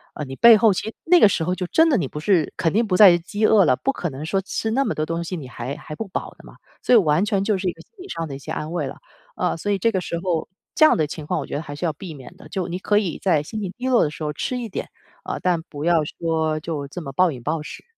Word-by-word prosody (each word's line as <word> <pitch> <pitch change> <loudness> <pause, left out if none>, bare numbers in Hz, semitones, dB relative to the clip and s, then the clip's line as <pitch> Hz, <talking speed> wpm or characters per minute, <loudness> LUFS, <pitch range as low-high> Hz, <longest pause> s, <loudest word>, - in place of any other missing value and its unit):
呃， - - -4
你 135 0 -7
背 235 - +8
后 220 0 +5
其 185 - -4
实 220 - -5
那 355 +1 +6
个 - - +8
时 175 - 0
候 180 +3 -1
就 185 - -3
真 325 - +4
的 275 - +3
你 160 -9 -1
不 150 - -7
是 165 -1 +1
肯 165 - +1
定 230 +3 +2
不 195 -4 0
再 185 -4 +8
饥 205 +5 -2
饿 210 -3 +5
了， 130 - +4
不 270 - -1
可 175 - -3
能 140 +2 -7
说 195 +4 0
吃 200 +3 -3
那 265 +5 +2
么 - - -1
多 155 - -1
东 165 +1 -3
西 170 +2 -5
你 140 -5 -8
还 125 +2 -6
还 150 - -9
不 220 - -5
饱 - - -4
的 - - -17
嘛。 - - -14 0.3
所 - - +3
以 - - +9
完 160 -3 +3
全 200 -2 0
就 205 -1 +1
是 190 0 -3
一 - - +1
个 - - -15
心 - - -23
理 - - -10
上 165 - -4
的 140 - -6
一 - - -8
些 155 - -8
安 155 0 -4
慰 175 - -2
了。 - - -8 0.4
啊， - - 0
所 205 +5 -2
以 200 - +2
这 230 +5 +2
个 190 - 0
时 170 -1 -4
候， 170 -4 -1 0.3
这 310 - +6
样 - - +5
的 155 -2 +1
情 155 0 -7
况 - - -1
我 - - -4
觉 - - -5
得 145 - -2
还 145 -3 -8
是 150 - -3
要 160 - 0
避 165 +2 -9
免 140 +4 -12
的， 195 - -13
就 185 -3 -3
你 175 0 -4
可 205 +2 +1
以 185 -7 -3
在 170 -6 +2
心 215 +8 -6
情 190 -3 -4
低 255 +1 -3
落 250 -2 +4
的 - - 0
时 155 - -8
候 150 - -1
吃 250 - -3
一 235 -2 -5
点， - - -5 0.3
啊， - - -4
但 175 -2 +1
不 145 -2 -8
要 170 -2 +3 0.2
说 160 -2 0
就 150 -3 -4
这 175 +6 -7
么 140 -4 -7
暴 180 +5 +3
饮 130 -4 -8
暴 155 +4 -1
食。 - - -9
175 Hz, 350 characters per minute, -22 LUFS, 155-205 Hz, 0.4 s, 以